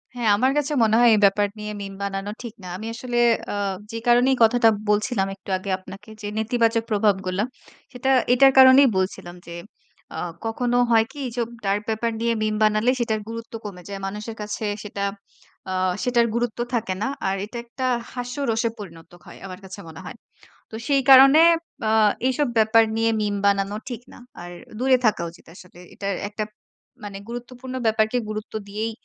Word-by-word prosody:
হ্যাঁ, 235 -3 0
আমার 260 +4 +2
কাছে 295 +1 0
মনে 220 0 +3
হয় 240 -1 +6
এই 215 - +4
ব্যাপার 205 +1 +3
নিয়ে 210 0 -5
মিম 195 0 -6
বানানো 200 +1 -3
ঠিক 235 - -7
না। 180 - -8
আমি 220 +3 -7
আসলে 240 0 -4 0.3
আ - - -3 0.4
যে 230 - -5
কারণেই 250 +2 +4
কথাটা 225 0 +5 0.2
বলছিলাম 210 -1 +1
একটু 195 - -15
আগে 195 +1 -7
আপনাকে 195 +3 -12
যে, 205 - -5
নেতিবাচক 230 0 +1
প্রভাবগুলা। 195 -2 +1 0.5
সেটা 250 +2 -2 0.2
এটার 270 +2 +6
কারণেই 260 +1 +8
বলছিলাম 180 -2 -3
যে, 170 - -8 0.6
আ - - -5 0.3
কখনো 245 +2 0
হয় 225 -1 +5
কি 295 - -15
এইসব 235 -1 -3 0.2
ডার্ক 200 +1 +1 0.2
ব্যাপার 235 -1 0
নিয়ে 235 0 +1
মিম 215 0 0
বানালে 215 +2 +3
সেটার 220 -2 0
গুরুত্ব 230 0 -8
কমে 180 -4 -8
যায়। 200 -1 -6
মানুষের 210 +3 -6
কাছে 210 +1 -4 0.2
সেটা 200 -1 -5 0.7
আ - - -3 0.3
সেটার 245 -2 +3
গুরুত্ব 235 -1 -2
থাকে 220 -5 -1
না। 245 - 0 0.2
আর 190 - 0
এটা 235 +3 -9
একটা 255 +2 -5 0.3
হাস্যরসে 245 -2 -2
পরিণত 165 -6 -11
হয়। - - -12
আমার 185 0 -8
কাছে 190 +1 -9
মনে 160 - -10
হয়। - - -8 0.6
তো - - -7
সেই 275 -1 +3
কারণে 270 +3 +9 0.5
আ - - +2 0.4
এইসব 260 +2 +1
ব্যাপার 220 +1 +5
নিয়ে 225 0 +2
মিম 205 -1 -1
বানানো 200 0 +1
ঠিক 240 -2 -6
না। - - -13 0.2
আর 175 - -8 0.3
দূরে 260 0 +4
থাকা 210 -5 +2
উচিত 175 - -19
আসলে। 180 -1 -15
এটার 200 -1 -3
একটা 215 0 -4 0.6
মানে 200 -1 -7
গুরুত্বপূর্ণ 245 +2 -7
ব্যাপারকে 220 +2 +2
গুরুত্ব 215 0 -6
দিয়েই 215 +3 -3
220 Hz, 175 wpm, -23 LUFS, 200-245 Hz, 0.7 s, কারণে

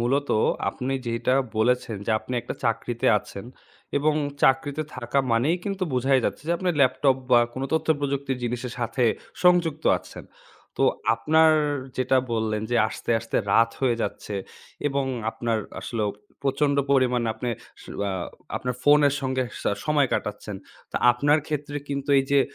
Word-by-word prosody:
মূলত 140 +4 +1 0.4
আপনি 130 +6 -3
যেটা 115 +2 +1 0.2
বলেছেন 120 0 +1
যে - - 0
আপনি 125 - -6
একটা 120 - -6
চাকরিতে 115 0 -1
আছেন। 100 0 -10 0.5
এবং 150 +1 +2 0.3
চাকরিতে 140 +3 +2
থাকা 140 - -1
মানেই 135 +10 +2
কিন্তু 195 -1 -3
বুঝাই 130 +1 +3
যাচ্ছে - - -2
যে - - +3
আপনার 180 -2 0
ল্যাপটপ 130 0 +3
বা 120 -1 +7
কোন 130 - -5
তথ্যপ্রযুক্তির 140 -4 0
জিনিসের 120 0 -3
সাথে 120 +1 0 0.4
সংযুক্ত 175 -4 +3
আছেন। - - -12 0.5
তো - - 0 0.3
আপনার 160 +7 +4 0.4
যেটা 130 +1 +2 0.2
বললেন 110 -1 -1
যে 120 - +2
আসতে, - - -6
আসতে 115 - -3 0.2
রাত 115 0 +5
হয়ে 125 -3 +2
যাচ্ছে 105 - -4 0.5
এবং 140 -1 -1 0.3
আপনার 115 -1 -1 0.2
আসলেও 110 -3 -2 0.3
প্রচণ্ড 140 +1 +1 0.2
পরিমাণ 125 -3 +3
আপনে 120 +2 -4 0.3
স - - -14 0.2
আ - - -1 0.5
আপনার 125 0 -3
ফোনের 145 -1 +5
সঙ্গে 130 -1 0 0.2
সা - - +1
সময় 150 -3 +2
কাটাচ্ছেন। 105 -1 -3 0.3
তা - - -3 0.2
আপনার 145 +5 +3
ক্ষেত্রে 145 -1 -3
কিন্তু 140 0 -4
এই 135 - +1
যে 140 - +6
130 Hz, 150 wpm, -25 LUFS, 120-145 Hz, 0.5 s, বা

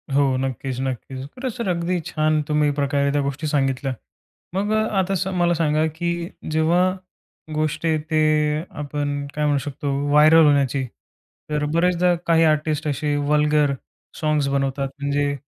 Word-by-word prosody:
हो, 145 - +5 0.2
नक्कीच, 130 -1 -3
नक्कीच. 130 0 -4
खरं 260 0 -3
सर 235 -5 -4
अगदी 175 0 0
छान 155 0 +1
तुम्ही 150 -1 +2
प्रकारे 140 0 +1
त्या 145 - +1
गोष्टी 140 +3 -3
सांगितल्या. 135 -2 0 0.6
मग 205 +2 0
अ, - - +3 0.2
आता 190 +1 0
सर 190 0 -1
मला 175 0 +3
सांगा 155 -1 +1
की 170 +1 -1 0.4
जेव्हा 160 +3 +3 0.7
गोष्ट 155 +1 -1
येते 155 0 0 0.6
आपण 145 0 -3
काय 150 - 0
म्हणू 145 -1 +2
शकतो 145 0 -3 0.2
व्हायरअल 155 +2 +6
होण्याची. 140 -2 +2 0.6
तर 150 0 -1
बरेचदा 180 +1 +3
काही 165 -1 +4
आर्टिस्ट 155 0 +1
असे 145 +1 -1
वल्गर 150 -1 +3 0.5
साँग्स 150 -3 +1
बनवतात. 135 0 -1
म्हणजे 140 0 0
150 Hz, 145 wpm, -22 LUFS, 140-160 Hz, 0.7 s, व्हायरअल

